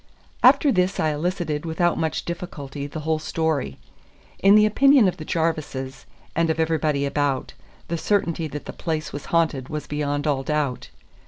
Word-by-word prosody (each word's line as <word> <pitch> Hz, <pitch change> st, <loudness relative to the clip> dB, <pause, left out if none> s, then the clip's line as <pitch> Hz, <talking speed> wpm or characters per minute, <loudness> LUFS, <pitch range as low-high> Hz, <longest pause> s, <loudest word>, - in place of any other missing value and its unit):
After 290 Hz, -, +6 dB
this 185 Hz, -1 st, +1 dB
I 155 Hz, -, +2 dB
elicited 155 Hz, -1 st, -2 dB
without 170 Hz, +1 st, +1 dB
much 160 Hz, -1 st, -2 dB
difficulty 145 Hz, -5 st, -6 dB
the 155 Hz, +2 st, -6 dB
whole 160 Hz, 0 st, 0 dB
story. 155 Hz, -, -1 dB, 0.6 s
In 195 Hz, +1 st, +6 dB
the 215 Hz, 0 st, +6 dB
opinion 270 Hz, +1 st, +5 dB
of 180 Hz, -, -1 dB
the 155 Hz, -, -8 dB
Jarvises, 150 Hz, -6 st, -2 dB, 0.3 s
and 165 Hz, 0 st, +2 dB
of 160 Hz, 0 st, 0 dB
everybody 155 Hz, -3 st, +1 dB
about, 140 Hz, -2 st, -1 dB, 0.3 s
the 170 Hz, 0 st, -2 dB
certainty 170 Hz, -5 st, 0 dB
that 150 Hz, 0 st, -7 dB
the -, -, -7 dB
place 160 Hz, -2 st, -3 dB
was 145 Hz, -, -6 dB
haunted 155 Hz, -6 st, 0 dB
was 150 Hz, -1 st, -4 dB
beyond 145 Hz, 0 st, -2 dB
all 145 Hz, -3 st, +1 dB
doubt. 145 Hz, -3 st, -2 dB
155 Hz, 165 wpm, -23 LUFS, 145-170 Hz, 0.6 s, After